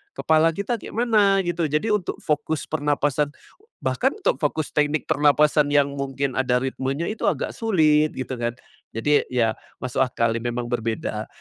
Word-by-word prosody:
kepala 160 +1 +3
kita 215 +4 -2
kayak - - -10
mana 210 -5 +3
gitu. 170 -2 -1
Jadi 150 +9 0
untuk 205 -4 0
fokus 150 +1 -1
pernapasan 145 -1 0 0.5
bahkan - - +1
untuk 415 - 0
fokus 150 0 -1
teknik 150 0 +1
pernapasan 150 0 +3
yang 145 -1 +3
mungkin 140 -1 -2
ada 125 -1 +1
ritmenya 135 +4 -2
itu 215 - -2
agak - - -3
sulit, 155 -9 +3
gitu 130 0 -4
kan. 120 0 -2 0.4
Jadi 145 +6 +2
ya, 115 -3 +1 0.3
masuk 130 +1 -1
akal 115 -3 +1
memang 120 +1 -3
berbeda. 110 -2 -2
145 Hz, 155 wpm, -23 LUFS, 130-160 Hz, 0.5 s, kepala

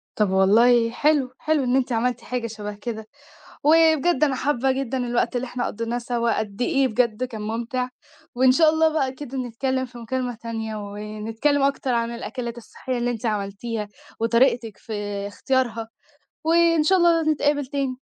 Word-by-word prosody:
طَب 210 -2 +2
والله 230 +5 +4
حلو، 285 0 +2
حلو 310 -3 +1
إن 250 0 +1
أنتِ 265 -1 +1
عملتِ 240 +1 0
حاجة 245 -1 -3
شبه 210 -2 -6
كده، 220 0 -6 0.6
وبجد 320 0 +4
أنا 275 -3 +2
حابة 270 -1 +1
جدًا 265 -1 -2
الوقت 245 0 0
اللي 245 - -1
إحنا 245 0 -3
قضيناه 230 +2 -3
سوا، 235 -1 0
قد 210 +1 -5
إيه 275 -1 +2
بجد 235 0 0
كان 230 -4 -5
مُمتع، 235 +4 -2 0.5
وإن 255 +1 +5
شاء 315 +4 +5
الله 320 +1 +3
بقى 270 -4 +1
كده 270 -1 -7
نتكلم 260 +2 -2
في 245 -1 -13
مكالمة 245 +1 -3
تانية، 225 -1 -5
ونتكلم 215 +7 -2
أكتر 275 -2 +1
عن 235 0 0
الأكلات 235 0 -5
الصحية 250 +2 -5
اللي 245 0 0
أنتِ 235 0 -5
عملتيها، 210 +1 -3 0.3
وطريقتك 230 -1 +2
في 225 - -8 0.3
اختيارها، 230 0 -1 0.5
وإن 330 -1 +4
شاء 380 +4 +4
الله 340 -2 +4
نتقابل 290 -1 +1
تاني. 270 -1 -2
245 Hz, 160 wpm, -23 LUFS, 225-270 Hz, 0.6 s, وإن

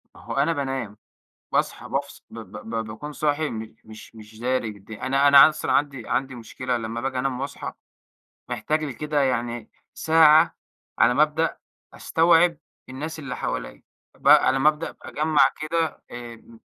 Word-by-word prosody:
ما - - -15
هو - - -7
أنا 145 +4 +2
بانام، 135 -7 -4 0.6
باصحى - - -1
بافص - - -4
ب - - -10
ب - - -10
ب 115 -1 -2
باكون 130 +8 -8
صاحي 150 +1 -1
مش 110 0 -8
مش 110 +1 -13
مش 110 0 -14
داري 125 -2 -1
بالدنيا، 105 +3 -9
أنا 135 +2 +3
أنا 140 +1 +9
أصلًا 155 - -3
عندي 140 -5 -1
عندي 135 0 -1
مشكلة 125 +2 -4
لمّا 115 0 -4
باجي 130 +1 -3
أنام 130 0 -2
وأصحى 140 +1 -5 0.8
محتاج 155 0 -1
لي 145 - -4
كده 150 +3 -2
يعني 120 -3 -2 0.2
ساعة 160 0 +5 0.4
على 125 - +4
ما 145 - +4
أبدأ 155 +1 0 0.4
أستوعب 165 +1 +3 0.3
الناس 150 +5 -6
اللي 135 -4 -6
حواليّ، - - -5 0.3
ب - - -1
على 130 +1 +6
ما 145 - +5
أبدأ 155 +1 -3
أجمع 155 0 +2
كده، 160 +1 -2
آآ 120 -1 -8
م، 115 0 -18
135 Hz, 165 wpm, -24 LUFS, 115-150 Hz, 0.8 s, أنا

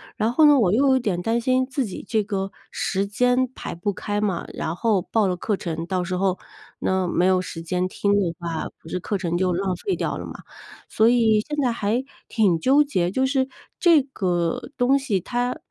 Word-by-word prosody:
然 220 +2 0
后 310 +4 +5
呢， 295 -1 +7
我 195 -3 +3
又 275 +5 +3
有 260 0 +4
点 185 -7 -1
担 230 +4 0
心 255 +2 +2
自 265 -1 -2
己 190 - -7
这 215 -2 +1
个 195 -1 -3 0.2
时 195 +1 -1
间 250 +5 +2
排 - - -6
不 195 +4 -2
开 205 +2 -3
嘛， 190 -5 -1
然 160 +2 -3
后 210 -2 +1
报 210 +2 +1
了 180 - 0
课 210 +3 -1
程， 165 -2 -4
到 185 0 -1
时 180 +1 -3
候， 190 -1 0 0.4
那 190 -1 0
没 175 - +1
有 185 -1 +3
时 165 -2 -7
间 180 +2 -1
听 200 +2 0
的 185 -5 +1
话， 170 -2 -3
不 160 - -13
是 180 - -2
课 200 +3 -2
程 175 -2 -2
就 185 -1 +1
浪 185 0 -1
费 385 - -2
掉 - - -2
了 - - -6
吗？ - - -8 0.6
所 220 +1 +3
以 225 -3 +4
现 300 0 -4
在 245 - +2
还 230 +3 -1 0.2
挺 195 -8 +2
纠 280 - +4
结， 180 -11 -1
就 260 +5 +1
是 265 -1 +1 0.3
这 335 -5 +6
个 180 -10 -2
东 260 +3 +4
西 240 -9 -1
它， 245 +5 -2
205 Hz, 235 characters per minute, -23 LUFS, 180-250 Hz, 0.6 s, 呢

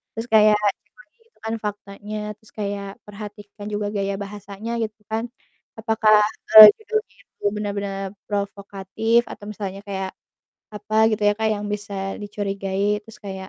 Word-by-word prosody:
terus 225 +2 -4
kayak 215 -1 +6
kan 205 -1 +2
cek - - -41
lagi - - -21
gitu 460 - -37
kan 225 - -2
faktanya, 205 +1 -6 0.2
terus 220 - -21
kayak 200 -1 -4 0.2
perhatikan 205 0 -10
juga 205 0 -2
gaya 200 0 -1
bahasanya, 205 +2 -7
gitu 215 -1 -5
kan, 225 +1 -1 0.6
apakah, 215 -1 +4 0.4
eee, 215 -1 +15 0.2
judulnya 435 +1 -3
itu - - -29
benar-benar 200 -1 -3 0.3
provokatif 200 +2 -1
atau 205 - -10
misalnya 195 -2 -6
kayak 190 -1 -3 0.6
apa 210 +1 -4 0.2
gitu 210 - -2
ya, - - +4
Kak, 220 0 +1
yang 205 - -5
bisa 205 -1 -4 0.3
dicurigai, 200 0 -2
terus 225 - -14
kayak 190 -1 -7
205 Hz, 150 wpm, -22 LUFS, 200-215 Hz, 0.6 s, eee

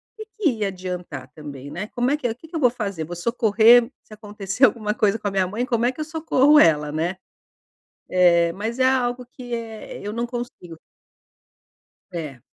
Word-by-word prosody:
"Que 435 - -8
que 370 -8 +3
ia 205 - +1
adiantar 180 -8 -6
também, 145 -3 -9
né? 195 +8 -5
Como 245 +2 -1
é 295 - +1
que 280 - -10
é 235 - +2
o - - -6
que 320 - -15
que 325 - -11
eu - - 0
vou 250 - +5
fazer? 200 -9 -4
Vou 175 +3 -7
socorrer, 230 +4 +4
se 215 - -15
acontecer 210 +1 -5
alguma 215 -2 0
coisa 210 +1 +1
com 205 - -3
a - - -1
minha 190 -1 +1
mãe. 220 +7 -2
Como 235 -1 0
é 250 - +2
que 285 - -17
eu 305 - -2
socorro 305 -2 +3
ela 150 -2 +4
né?" 170 +4 -2 1.1
Eh, 170 -1 +4
mas 220 +6 -4
é 260 0 +4
algo 250 -1 0
que, 245 -1 -8
eh, 225 -2 -7
eu 205 +1 -5
não 235 +1 -2
consigo. 240 -9 -7 1.4
É. 150 -8 -7
215 Hz, 205 wpm, -23 LUFS, 180-245 Hz, 1.4 s, vou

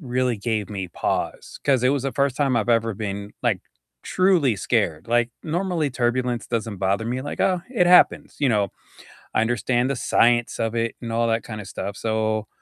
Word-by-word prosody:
really 125 -4 0
gave 105 -1 -2
me 95 -3 -4
pause, - - -3
'cause 135 -4 +3
it - - +5
was 140 -2 0
the 135 - -2
1st 140 -2 0
time 135 -4 +1
I've 110 +1 0
ever 115 -1 +2
been, 100 0 -5
like, - - +1 0.4
truly 175 - +2
scared. 95 -7 0
Like, 120 0 +2
normally 170 -2 -1
turbulence 120 -1 -1
doesn't 115 -3 -2
bother 100 +3 0
me, 125 +2 -2
like, 145 - -5
"Oh, 180 -2 +2
it 180 -9 +2
happens," 180 0 +5
you 140 - +3
know, 105 -4 +2 0.7
I - - +3
understand 120 +2 +1
the 140 - -1
science 120 0 +2
of 115 0 -1
it 115 0 -1
and 115 -2 -6
all 115 +1 +1
that 115 0 +1
kinda 105 -2 -7
stuff, 100 +1 -5
so 110 -1 -1
120 Hz, 190 wpm, -23 LUFS, 110-130 Hz, 0.7 s, it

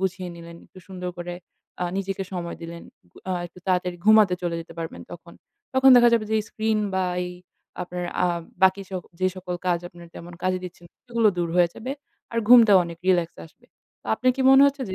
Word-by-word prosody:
গুছিয়ে 190 -1 -2
নিলেন, 170 0 -11
একটু - - -17
সুন্দর 180 -1 -5
করে 175 0 -5 0.5
আ - - +1
নিজেকে 195 0 -3
সময় 175 -2 -5
দিলেন। 170 0 -8 0.3
উ - - -12
আ - - +1
একটু 175 - -17
তাড়াতাড়ি 180 -1 0
ঘুমাতে 215 -4 +6
চলে 175 -1 -2
যেতে 165 - -11
পারবেন 165 -1 -6
তখন। - - -12 0.4
তখন 265 0 +6
দেখা 240 0 +7
যাবে 225 -2 +1
যে 220 - +1
screen 220 0 -1 0.2
বা 190 0 +1 0.2
এই 180 - -6 0.5
আপনার 180 0 -5 0.2
আ - - +3 0.4
বাকি 190 +1 +4
সব 185 -2 -4 0.2
যে 185 - +3
সকল 180 -1 -5
কাজ 175 -1 +2
আপনার 175 0 -14
তেমন 175 +1 -10
কাজে 185 0 +1
দিচ্ছে 180 -1 -10
না, - - -26
সেগুলো 235 -3 +2
দূর 170 -1 0
হয়ে 175 -1 +5
যাবে। 255 +4 -6 0.4
আর 230 - -1
ঘুমটা 235 -4 +8
অনেক 170 -1 -8
relax 175 -3 +3 0.2
আসবে। 240 +9 -25 0.4
তো - - -16
আপনার 255 +3 +2
কি 265 - 0
মনে 270 +1 +8
হচ্ছে 280 -1 -1
যে - - -3
185 Hz, 210 wpm, -24 LUFS, 175-215 Hz, 0.5 s, ঘুমটা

